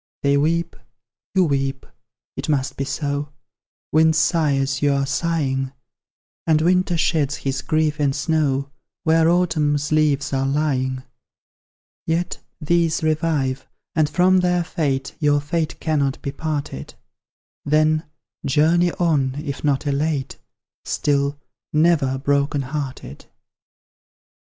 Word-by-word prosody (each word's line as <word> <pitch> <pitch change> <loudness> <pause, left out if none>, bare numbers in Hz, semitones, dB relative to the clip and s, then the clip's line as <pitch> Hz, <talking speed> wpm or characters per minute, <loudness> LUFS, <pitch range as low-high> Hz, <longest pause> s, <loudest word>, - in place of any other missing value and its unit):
They 140 0 +3
weep, 165 +4 +1 0.6
you 190 - +5
weep, 135 -2 -1 0.5
it - - -5
must 140 -3 0
be 135 - -2
so; 145 0 -2 0.6
Winds 160 0 +4
sigh 155 -2 +2
as 135 -1 -1
you 145 -1 +3
are 140 0 +1
sighing, 140 -3 -1 0.7
And 155 -1 +4
winter 180 +1 +2
sheds 150 -4 0
its 135 0 -1
grief 155 -1 0
in 145 -2 +2
snow 140 -2 0 0.3
Where 160 -1 +4
Autumn's 155 -5 +1
leaves 150 -2 +2
are 135 0 +1
lying: 130 -3 0 1.0
Yet, 170 +2 -1 0.2
these 165 0 +1
revive, 155 -4 0 0.3
and 155 -2 +2
from 185 +3 +4
their 180 -1 +2
fate 140 -5 -2
Your 145 -1 +3
fate 155 +2 -2
cannot 145 -4 0
be 140 - -2
parted: 145 - -4 0.7
Then, 155 +1 +2 0.4
journey 165 +5 +3
on, 145 -7 +1
if 140 -2 -5
not 145 0 +1
elate, 145 -1 -1 0.4
Still, 140 0 0 0.3
NEVER 150 -4 +3
broken 140 +1 0
hearted! 135 - -6
150 Hz, 120 wpm, -21 LUFS, 140-160 Hz, 1.0 s, you